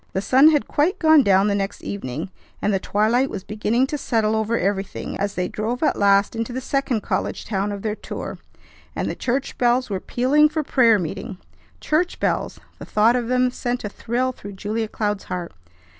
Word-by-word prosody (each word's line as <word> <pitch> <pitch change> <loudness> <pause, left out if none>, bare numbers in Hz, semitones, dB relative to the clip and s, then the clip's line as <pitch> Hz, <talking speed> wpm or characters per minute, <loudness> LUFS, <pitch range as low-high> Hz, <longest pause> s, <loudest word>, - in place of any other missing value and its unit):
The - - 0
sun 260 +9 +6
had 295 -3 +1
quite 315 +6 +1
gone 315 -2 +6
down 195 -3 +4
the 205 - +1
next 200 0 -3
evening, 160 -2 -5 0.3
and 205 - 0
the 195 - +1
twilight 225 +8 +1
was 190 - -6
beginning 215 +5 0
to 295 +2 -4
settle 220 -4 +1
over 220 +1 0
everything 195 0 -2
as 200 0 -2
they 180 0 -1
drove 230 - -3
at 305 - +2
last 200 +1 +3
into 230 +2 -3
the 255 - -3
second 260 -3 -1
college - - -2
town 200 -1 -1
of 200 -1 -6
their 215 -1 -1
tour, - - -7 0.6
and - - -2
the - - -2
church 260 +3 -2
bells 245 -1 +2
were 190 - -1
pealing 285 +8 +3
for 310 0 -2
prayer 235 -6 +4
meeting. 195 +3 -5 0.4
Church 330 +4 0
bells! - - -1 0.2
The - - -8
thought 220 +3 +3
of 240 -2 -1
them 250 0 +2
sent 245 0 -3
a 210 - -3
thrill 245 +5 -1
through 205 -5 -10
Julia 215 +3 -3
Cloud's 210 -2 -2
heart. 180 -2 -5
220 Hz, 200 wpm, -22 LUFS, 200-255 Hz, 0.6 s, sun